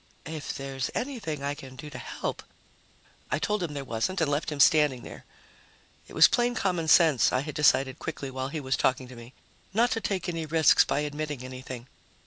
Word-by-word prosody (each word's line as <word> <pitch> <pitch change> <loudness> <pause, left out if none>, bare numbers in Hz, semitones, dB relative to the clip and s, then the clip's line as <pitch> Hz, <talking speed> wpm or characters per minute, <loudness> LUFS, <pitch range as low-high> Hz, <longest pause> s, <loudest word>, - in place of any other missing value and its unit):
"If 155 -1 -5
there's 135 -1 -4
anything 210 - -3
I 140 0 -1
can 135 -3 -11
do 150 +3 -9
to 125 - -7
help - - -5 0.5
" - - -31
I - - +2
told 210 +6 -1
him 160 -4 -3
there 140 - -4
wasn't 120 +11 -2
and 160 -3 +1
left 150 +2 -1
him 150 - -5
standing 145 -4 +4
there. - - -10 0.8
It - - -14
was - - +9
plain 240 0 +1
common 175 -4 -1
sense, 155 -7 +5
I 130 - +1
had 150 +1 -6
decided 135 -3 +3
quickly 140 -4 -5
while 130 0 -3
he 155 +3 -4
was 135 -2 -1
talking 130 0 0
to 130 - -11
me, 120 +2 -12 0.4
not 235 +2 +3
to 225 0 -1
take 190 -3 -2
any 165 -2 -3
risks 160 -2 +5
by 145 - -1
admitting 150 -2 -4
anything. 130 -1 -8
145 Hz, 205 wpm, -27 LUFS, 130-165 Hz, 0.8 s, was